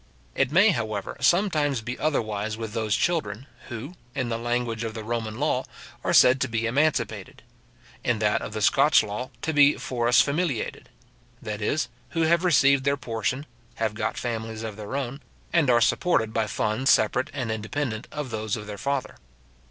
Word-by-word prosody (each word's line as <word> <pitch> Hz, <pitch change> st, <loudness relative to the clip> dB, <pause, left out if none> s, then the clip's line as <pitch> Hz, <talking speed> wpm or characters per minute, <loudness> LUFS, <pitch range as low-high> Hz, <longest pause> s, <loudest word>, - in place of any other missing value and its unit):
It -, -, +1 dB
may, 190 Hz, +7 st, +6 dB
however, 110 Hz, -, -2 dB
sometimes 155 Hz, -, +2 dB
be 120 Hz, +3 st, -4 dB
otherwise 110 Hz, -8 st, -1 dB
with 110 Hz, -2 st, -6 dB
those 110 Hz, -2 st, 0 dB
children, 135 Hz, -9 st, -1 dB, 0.2 s
who, 125 Hz, +7 st, -6 dB, 0.2 s
in 130 Hz, -4 st, -1 dB
the 115 Hz, -, -1 dB
language 120 Hz, -1 st, -1 dB
of 115 Hz, -1 st, -4 dB
the 110 Hz, -, -5 dB
Roman 110 Hz, -1 st, -3 dB
law, 140 Hz, -3 st, +1 dB, 0.4 s
are -, -, 0 dB
said 130 Hz, +2 st, +6 dB
to 130 Hz, -, +2 dB
be 115 Hz, -1 st, -1 dB
emancipated; 145 Hz, +7 st, -1 dB, 0.6 s
in 125 Hz, -2 st, +1 dB
that 105 Hz, -1 st, +1 dB
of -, -, -6 dB
the 110 Hz, -1 st, -2 dB
Scotch 140 Hz, +7 st, +5 dB
law, 105 Hz, +5 st, -5 dB
to 160 Hz, -, -1 dB
be 145 Hz, 0 st, +6 dB
foris 120 Hz, -1 st, +2 dB
familiated; 145 Hz, -4 st, 0 dB, 0.5 s
that 105 Hz, 0 st, -5 dB
is, 150 Hz, +9 st, 0 dB, 0.3 s
who -, -, +3 dB
have 170 Hz, +2 st, +3 dB
received 140 Hz, -5 st, +4 dB
their 140 Hz, +1 st, +1 dB
portion, 125 Hz, +2 st, -2 dB, 0.3 s
have 110 Hz, -2 st, -1 dB
got 110 Hz, -, -2 dB
families 115 Hz, -1 st, -4 dB
of 110 Hz, -2 st, -5 dB
their 105 Hz, +4 st, -6 dB
own, 135 Hz, 0 st, -3 dB, 0.3 s
and 165 Hz, -6 st, +3 dB
are 120 Hz, -1 st, +5 dB
supported 110 Hz, -7 st, +2 dB
by 110 Hz, -1 st, 0 dB
funds 110 Hz, +5 st, 0 dB
separate 125 Hz, +4 st, +3 dB
and 130 Hz, -5 st, -3 dB
independent 110 Hz, +2 st, -3 dB
of 150 Hz, -5 st, -5 dB
those 110 Hz, -1 st, -2 dB
of 105 Hz, -2 st, -7 dB
their 105 Hz, -1 st, -7 dB
father. 140 Hz, 0 st, -2 dB
120 Hz, 175 wpm, -25 LUFS, 110-140 Hz, 0.6 s, may